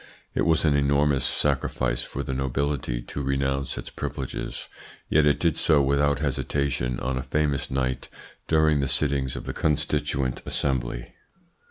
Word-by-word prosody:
It - - +1
was 80 0 +3
an 75 -2 +4
enormous 70 0 +3
sacrifice - - 0
for 70 - -5
the 65 - -3
nobility 65 -2 -1
to 70 - -5
renounce 70 0 -1
its - - -6
privileges, 65 -2 -5 0.4
yet 75 -1 +4
it 75 - +3
did 85 -3 +2
so 80 -2 +4
without 70 +1 +3
hesitation 65 -3 -1
on 65 0 -1
a - - -2
famous 70 +1 0
night 65 -1 -1 0.4
during 80 -2 +4
the 70 - +1
sittings 70 -2 0
of - - -5
the - - -4
Constituant 75 -3 0
Assembly. 65 -3 -2
70 Hz, 150 wpm, -26 LUFS, 65-75 Hz, 0.4 s, an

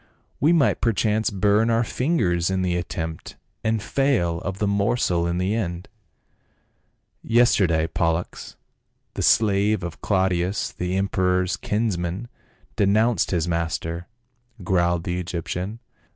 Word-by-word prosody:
We 150 - +4
might 165 -5 +3
perchance 110 -1 +1
burn 105 +3 +2
our 115 +1 +2
fingers 100 - 0
in 95 -1 0
the 90 -1 0
attempt, 80 -2 -5 0.3
and 110 -1 0
fail 110 -12 +1
of 95 0 -4
the 105 - 0
morsel 100 -4 +1
in 85 0 -1
the 95 +3 0
end." 90 -4 -3 0.7
" - - -46 0.2
Yesterday 85 -9 +3
Pollux, 85 +1 -2 0.6
the - - -4
slave 105 -2 +3
of 85 -1 -6
Claudius 95 -1 0
the 90 +1 -3
em 100 0 +1
peror's 90 -1 +1
kinsman, 105 0 -2 0.5
denounced 105 +1 +2
his 85 -2 0
master," 85 0 -2 0.6
growled 85 -2 +1
the 90 0 -2
Egyptian. 90 +4 -4
95 Hz, 125 wpm, -23 LUFS, 85-110 Hz, 0.7 s, We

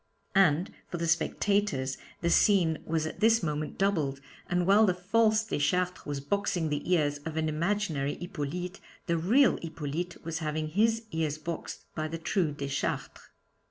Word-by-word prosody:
And 180 -3 +3 0.2
for 175 - -4
the 170 0 -1
spectators 165 -5 +1 0.2
the 170 - +1
scene 170 -7 +4
was 160 -1 0
at 155 - -6
this 225 -1 +4
moment 150 -1 -2
doubled, 160 -9 +1 0.3
and 175 0 +1
while 205 +3 +6
the 180 - +2
false 215 +4 +2
Deschartres 180 -1 0
was 145 -1 -2
boxing 175 +1 -1
the 150 +4 -2
ears 145 -4 +2
of 155 +2 -6
an 160 0 +1
imaginary 155 -3 0
Hippolyte, 180 +1 -5 0.3
the 170 -1 0
real 235 - +4
Hippolyte 165 +1 -4
was 165 -1 -3
having 155 -1 -2
his 225 +6 +2
ears 155 -2 -1
boxed 165 +1 -6
by 155 0 -2
the 165 +1 -4
true 165 -1 0
Deschartres. 140 -1 -3
165 Hz, 160 wpm, -29 LUFS, 155-195 Hz, 0.3 s, while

